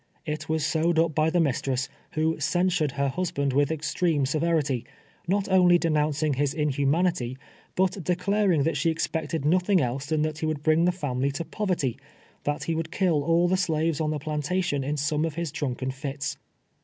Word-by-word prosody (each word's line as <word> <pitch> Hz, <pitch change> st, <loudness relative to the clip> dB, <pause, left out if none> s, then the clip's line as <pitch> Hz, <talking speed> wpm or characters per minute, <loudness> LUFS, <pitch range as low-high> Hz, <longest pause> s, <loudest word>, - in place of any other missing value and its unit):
It 150 Hz, 0 st, -4 dB
was 160 Hz, -2 st, +1 dB
sewed 160 Hz, +1 st, +1 dB
up 165 Hz, -1 st, +3 dB
by 155 Hz, +1 st, +2 dB
the 175 Hz, -, +1 dB
mistress, 135 Hz, -3 st, 0 dB, 0.3 s
who 160 Hz, +1 st, 0 dB
censured 165 Hz, -1 st, +1 dB
her 140 Hz, 0 st, 0 dB
husband 140 Hz, -2 st, -1 dB
with 145 Hz, +2 st, +2 dB
extreme 155 Hz, -1 st, 0 dB
severity, 150 Hz, -3 st, 0 dB, 0.4 s
not 195 Hz, +2 st, +1 dB
only 180 Hz, -2 st, +5 dB
denouncing 155 Hz, -2 st, +1 dB
his 140 Hz, +1 st, 0 dB
inhumanity, 145 Hz, -2 st, 0 dB, 0.4 s
but 185 Hz, 0 st, 0 dB
declaring 180 Hz, -2 st, +2 dB
that 165 Hz, -, 0 dB
she 165 Hz, -, +2 dB
expected 160 Hz, -2 st, -2 dB
nothing 180 Hz, +4 st, +3 dB
else 135 Hz, +1 st, -2 dB
than 155 Hz, 0 st, +1 dB
that 155 Hz, 0 st, -2 dB
he 160 Hz, -, -1 dB
would 150 Hz, -2 st, -3 dB
bring 160 Hz, +2 st, +3 dB
the 180 Hz, -, +4 dB
family 140 Hz, -6 st, -1 dB
to 165 Hz, +4 st, -4 dB
poverty 180 Hz, -, -2 dB, 0.2 s
— -, -, -31 dB
that 145 Hz, 0 st, -1 dB
he 165 Hz, -, -1 dB
would 160 Hz, 0 st, -2 dB
kill 170 Hz, -5 st, +2 dB
all 170 Hz, +3 st, +3 dB
the 185 Hz, +1 st, +2 dB
slaves 160 Hz, -3 st, 0 dB
on 155 Hz, -, 0 dB
the 155 Hz, -, -1 dB
plantation 150 Hz, +1 st, -1 dB
in 145 Hz, +3 st, -2 dB
some 150 Hz, +1 st, 0 dB
of 160 Hz, -2 st, -2 dB
his 170 Hz, -3 st, -3 dB
drunken 130 Hz, -2 st, -3 dB
fits. 140 Hz, +1 st, -4 dB
155 Hz, 185 wpm, -26 LUFS, 145-170 Hz, 0.4 s, only